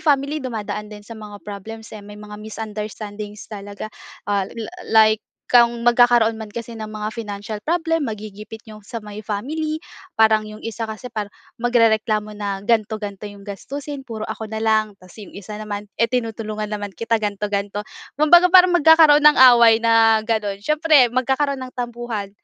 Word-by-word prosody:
family 290 Hz, 0 st, +1 dB
dumadaan 215 Hz, -4 st, -5 dB
din 210 Hz, -1 st, -11 dB
sa 230 Hz, -, -10 dB
mga 210 Hz, -2 st, -11 dB
problems, 220 Hz, +2 st, -9 dB
eh, 215 Hz, -, -8 dB
may 205 Hz, +1 st, -12 dB
mga 210 Hz, 0 st, -10 dB
misunderstandings 210 Hz, -1 st, -7 dB
talaga. 205 Hz, +1 st, -8 dB, 0.3 s
Ah, 200 Hz, -2 st, -1 dB
la 230 Hz, +9 st, -8 dB, 0.2 s
like 220 Hz, -1 st, +5 dB, 0.3 s
kung 235 Hz, -1 st, +4 dB
magkakaroon 240 Hz, -2 st, +4 dB
man 220 Hz, -, -6 dB
kasi 230 Hz, +1 st, -8 dB
ng 215 Hz, -, -5 dB
mga 215 Hz, 0 st, -5 dB
financial 210 Hz, -1 st, -6 dB
problem, 325 Hz, -3 st, 0 dB
magigipit 215 Hz, 0 st, -8 dB
'yong 215 Hz, -1 st, -13 dB
sa 230 Hz, -2 st, -6 dB
may 210 Hz, 0 st, -9 dB
family, 305 Hz, -, -4 dB, 0.3 s
parang 220 Hz, -3 st, +3 dB
'yong 215 Hz, 0 st, -11 dB
isa 225 Hz, 0 st, -4 dB
kasi 220 Hz, +3 st, -8 dB
parang, 210 Hz, -3 st, -5 dB, 0.2 s
magrereklamo 220 Hz, -3 st, +2 dB
na 200 Hz, -1 st, -3 dB
ganito-ganito 215 Hz, -2 st, -1 dB
'yong 205 Hz, -1 st, -11 dB
gastusin, 270 Hz, +7 st, -7 dB
"Puro 220 Hz, -2 st, -6 dB
ako 220 Hz, -, -5 dB
na 220 Hz, +1 st, -5 dB
lang," 215 Hz, -2 st, +1 dB
'tas 185 Hz, +2 st, -18 dB
'yong 205 Hz, -, -11 dB
isa 210 Hz, +2 st, -8 dB
naman, 205 Hz, -1 st, -6 dB
"Eh, 230 Hz, -, +4 dB
tinutulungan 220 Hz, -3 st, -3 dB
naman 205 Hz, -2 st, -5 dB
kita," 230 Hz, 0 st, 0 dB
ganito, 210 Hz, -1 st, -3 dB
ganito. 200 Hz, 0 st, -2 dB, 0.3 s
Kumbaga 345 Hz, +5 st, +6 dB
parang 360 Hz, 0 st, +7 dB
magkakaroon 305 Hz, -1 st, +6 dB
ng 300 Hz, -, +8 dB, 0.2 s
away 230 Hz, -1 st, +5 dB
na 225 Hz, -1 st, +4 dB
gano'n, 210 Hz, -3 st, -2 dB
siyempre 305 Hz, -3 st, +4 dB
magkakaroon 265 Hz, +3 st, 0 dB
ng 255 Hz, -, -15 dB
tampuhan, 240 Hz, -4 st, -5 dB
220 Hz, 165 wpm, -21 LUFS, 210-240 Hz, 0.3 s, ng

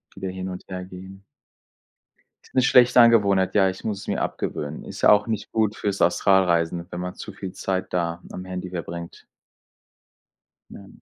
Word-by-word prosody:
wieder 95 Hz, -, -5 dB
hin 95 Hz, 0 st, -5 dB
und 90 Hz, -, -7 dB
her 90 Hz, -1 st, -5 dB
gehen. 95 Hz, +1 st, -11 dB, 1.2 s
Ist -, -, -22 dB
'ne 130 Hz, -, +5 dB
schlechte 125 Hz, -1 st, +6 dB
Angewohnheit, 100 Hz, -5 st, +5 dB
ja, 95 Hz, -2 st, +4 dB
ich 95 Hz, -, -8 dB
muss 105 Hz, -3 st, -3 dB
es -, -, -11 dB
mir -, -, -1 dB
abgewöhnen. 75 Hz, +1 st, -4 dB
Ist -, -, -9 dB
ja -, -, +7 dB
auch 105 Hz, +1 st, +5 dB
nicht 110 Hz, -2 st, -4 dB
gut 110 Hz, -1 st, +1 dB
fürs 100 Hz, -1 st, -2 dB
Astralreisen, 85 Hz, -2 st, +2 dB
wenn 90 Hz, -, -6 dB
man 90 Hz, 0 st, -4 dB
zu -, -, -9 dB
viel 95 Hz, -, -7 dB
Zeit 95 Hz, 0 st, -3 dB
da 85 Hz, -1 st, -1 dB
am 90 Hz, -, -7 dB
Handy 90 Hz, -1 st, -6 dB
verbringt. 85 Hz, -1 st, -7 dB, 1.5 s
Ja. 100 Hz, -, -11 dB
95 Hz, 175 wpm, -24 LUFS, 90-100 Hz, 1.5 s, ja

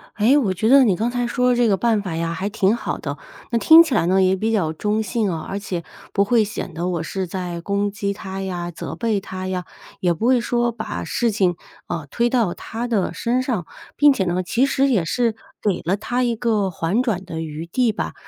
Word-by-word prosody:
诶， 235 Hz, +7 st, +4 dB
我 210 Hz, -9 st, +1 dB
觉 195 Hz, +4 st, -1 dB
得 275 Hz, 0 st, +8 dB
你 200 Hz, -6 st, +3 dB
刚 230 Hz, +4 st, -1 dB
才 245 Hz, -1 st, -1 dB
说 250 Hz, +1 st, +2 dB
这 240 Hz, -1 st, +3 dB
个 200 Hz, -3 st, +3 dB
办 225 Hz, 0 st, +2 dB
法 185 Hz, -5 st, -4 dB
呀 165 Hz, 0 st, -2 dB
还 190 Hz, +5 st, -3 dB
挺 205 Hz, 0 st, +2 dB
好 -, -, -3 dB
的， -, -, -5 dB, 0.3 s
那 235 Hz, -, +2 dB
听 325 Hz, +5 st, +9 dB
起 305 Hz, -6 st, -3 dB
来 190 Hz, -, +2 dB
呢 190 Hz, +1 st, +3 dB
也 185 Hz, +1 st, +3 dB
比 220 Hz, +4 st, -1 dB
较 165 Hz, -8 st, +1 dB
中 210 Hz, +6 st, -1 dB
性 215 Hz, +1 st, -1 dB
啊， 160 Hz, -1 st, -4 dB
而 200 Hz, -, -3 dB
且 180 Hz, -5 st, -4 dB, 0.3 s
不 200 Hz, -, +3 dB
会 225 Hz, +1 st, +3 dB
显 205 Hz, -4 st, -5 dB
得 170 Hz, +3 st, -3 dB
我 170 Hz, -3 st, -1 dB
是 190 Hz, +3 st, -3 dB
在 175 Hz, -1 st, -4 dB
攻 200 Hz, +2 st, -1 dB
击 200 Hz, -1 st, -2 dB
他 195 Hz, -1 st, -6 dB
呀、 175 Hz, -2 st, -4 dB
责 -, -, -6 dB
备 225 Hz, -4 st, 0 dB
他 185 Hz, 0 st, -6 dB
呀， 180 Hz, -2 st, -3 dB, 0.3 s
也 175 Hz, -2 st, +2 dB
不 170 Hz, +7 st, -3 dB
会 255 Hz, 0 st, +4 dB
说 240 Hz, 0 st, 0 dB
把 220 Hz, -1 st, -5 dB
事 240 Hz, -, 0 dB
情， 185 Hz, -4 st, +1 dB, 0.3 s
呃， 160 Hz, -4 st, -4 dB
推 235 Hz, 0 st, +1 dB
到 235 Hz, -8 st, +1 dB
他 235 Hz, +2 st, -5 dB
的 210 Hz, -6 st, 0 dB
身 245 Hz, +2 st, 0 dB
上， 225 Hz, -10 st, -2 dB, 0.3 s
并 290 Hz, 0 st, +6 dB
且 205 Hz, -8 st, 0 dB
呢 180 Hz, +1 st, 0 dB
其 230 Hz, +8 st, +1 dB
实 275 Hz, 0 st, +2 dB
也 200 Hz, -11 st, +2 dB
是 230 Hz, +4 st, 0 dB, 0.3 s
给 200 Hz, -4 st, 0 dB
了 185 Hz, +3 st, +2 dB
他 245 Hz, +4 st, -1 dB
一 235 Hz, -1 st, +1 dB
个 220 Hz, -4 st, 0 dB
缓 175 Hz, +9 st, 0 dB
转 205 Hz, -7 st, -1 dB
的 160 Hz, -2 st, -5 dB
余 160 Hz, +1 st, -6 dB
地 240 Hz, +6 st, +1 dB
吧。 215 Hz, -, -4 dB
205 Hz, 255 characters per minute, -21 LUFS, 180-235 Hz, 0.3 s, 听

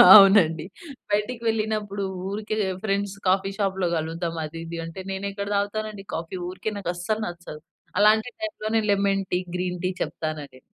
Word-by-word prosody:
అవునండి. 190 Hz, -6 st, +7 dB, 0.5 s
బయటకి 210 Hz, +4 st, 0 dB
వెళ్ళినప్పుడు 215 Hz, -2 st, 0 dB, 0.2 s
ఊరికే 210 Hz, +2 st, -2 dB, 0.3 s
ఫ్రెండ్స్ 200 Hz, -1 st, 0 dB
కాఫీ 190 Hz, +1 st, +3 dB
షాప్‌లో 190 Hz, -3 st, +1 dB
గలుద్దాం 165 Hz, +1 st, -2 dB
అది, 155 Hz, +2 st, -6 dB
ఇది 165 Hz, 0 st, -5 dB
అంటే. 165 Hz, +3 st, -8 dB
నేను 195 Hz, +1 st, -3 dB
ఎక్కడ 200 Hz, 0 st, -4 dB
తాగుతానండి 205 Hz, 0 st, -2 dB
కాఫీ 165 Hz, +3 st, -4 dB
ఊరికే 190 Hz, +4 st, -4 dB
నాకు 195 Hz, -4 st, -3 dB
అస్సలు 215 Hz, +5 st, -1 dB
నచ్చదు. 175 Hz, -3 st, -8 dB, 0.4 s
అలాంటి 215 Hz, +3 st, +5 dB
టైమ్‌లోనే 225 Hz, -9 st, 0 dB
లెమన్ 200 Hz, -1 st, +2 dB
టీ, 180 Hz, -, +3 dB, 0.2 s
గ్రీన్ 180 Hz, 0 st, -2 dB
టీ 185 Hz, -, +2 dB
చెప్తానండి. 150 Hz, -4 st, -4 dB
195 Hz, 145 wpm, -25 LUFS, 175-210 Hz, 0.5 s, అవునండి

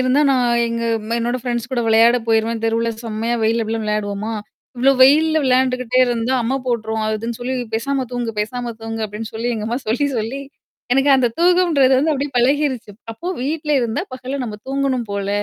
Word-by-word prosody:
இருந்தா 255 Hz, +3 st, +3 dB
நான் 255 Hz, -2 st, +2 dB, 0.2 s
எங்க 230 Hz, 0 st, -3 dB, 0.4 s
என்னோட 240 Hz, +2 st, -1 dB
ஃப்ரெண்ட்ஸ் 240 Hz, 0 st, -3 dB
கூட 245 Hz, -, +1 dB
விளையாட 230 Hz, +2 st, +5 dB
போயிருவேன். 225 Hz, 0 st, +1 dB
தெருவுல 230 Hz, +1 st, 0 dB
செம்மையா 225 Hz, +2 st, -2 dB
வெயில்ல 225 Hz, +1 st, +2 dB
எப்டி 220 Hz, -, -4 dB
எல்லாம் 225 Hz, -1 st, -2 dB
விளையாடுவோமா! 210 Hz, 0 st, -2 dB, 0.5 s
"இவ்ளோ 265 Hz, +3 st, +4 dB
வெயில்ல 315 Hz, +4 st, +5 dB
விளையாண்டுகிட்டே 255 Hz, -1 st, +2 dB
இருந்தா 240 Hz, +2 st, 0 dB
அம்ம 260 Hz, +4 st, 0 dB
போட்டுருவோம். 220 Hz, -2 st, -1 dB
அதுன்னு 225 Hz, +2 st, -3 dB
சொல்லி 255 Hz, +2 st, -2 dB, 0.2 s
பேசாம 265 Hz, +3 st, -1 dB
தூங்க, 240 Hz, -2 st, -2 dB
பேசாம 240 Hz, +2 st, -3 dB
தூங்க" 225 Hz, 0 st, -5 dB
அப்டின்னு 210 Hz, +2 st, -7 dB
சொல்லி 230 Hz, +2 st, -2 dB
எங்க 215 Hz, -1 st, -4 dB
அம்மா 240 Hz, +3 st, -1 dB
சொல்லி 285 Hz, +6 st, +1 dB
சொல்லி. 235 Hz, +6 st, -3 dB, 0.5 s
எனக்கு 270 Hz, +2 st, +3 dB
அந்த 250 Hz, -2 st, +2 dB
தூக்கம்ன்றது 340 Hz, -7 st, +4 dB
வந்து 310 Hz, +3 st, +2 dB
அப்படியியே 280 Hz, 0 st, -3 dB
பழகிருச்சு. 260 Hz, -2 st, +1 dB, 0.2 s
அப்போ 225 Hz, +11 st, -10 dB, 0.2 s
வீட்ல 300 Hz, +2 st, -2 dB
இருந்தா 235 Hz, +5 st, -1 dB
பகல 260 Hz, +2 st, -5 dB
நம்ம 210 Hz, -3 st, -6 dB
தூங்கணும் 270 Hz, -3 st, -1 dB
போல. 200 Hz, 0 st, -3 dB
240 Hz, 175 wpm, -19 LUFS, 225-265 Hz, 0.5 s, விளையாட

